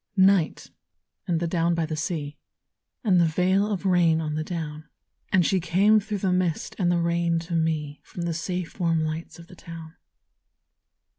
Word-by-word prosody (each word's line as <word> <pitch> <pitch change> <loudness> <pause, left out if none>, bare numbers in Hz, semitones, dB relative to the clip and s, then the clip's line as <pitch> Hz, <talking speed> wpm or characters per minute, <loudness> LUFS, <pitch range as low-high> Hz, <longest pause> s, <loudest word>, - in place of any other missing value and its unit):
NIGHT, 190 -3 +3 0.6
and 170 -3 +1
the 170 - -1
down 170 0 +1
by 165 -1 0
the 155 0 -4
sea, 155 -2 -3 0.7
And 185 -6 +4
the 170 - +4
veil 185 +5 +2
of 200 -1 -3
rain 175 -3 +4
on 155 -2 -3
the 155 +1 -2
down; 155 -2 -6 0.4
And 185 -4 +4
she 190 - +2
came 195 +5 +4
through 210 0 -4
the 190 -1 0
mist 180 -3 -1
and 175 -2 +2
the 175 - +2
rain 170 0 +1
to 170 +1 -7
me 155 -3 -1
From 175 - -7
the 170 -1 -1
safe 180 +3 -4
warm 165 -2 +1
lights 155 +1 -5
of 170 - -12
the 180 +1 -15
town. 165 -2 -10
170 Hz, 180 wpm, -25 LUFS, 160-185 Hz, 0.7 s, And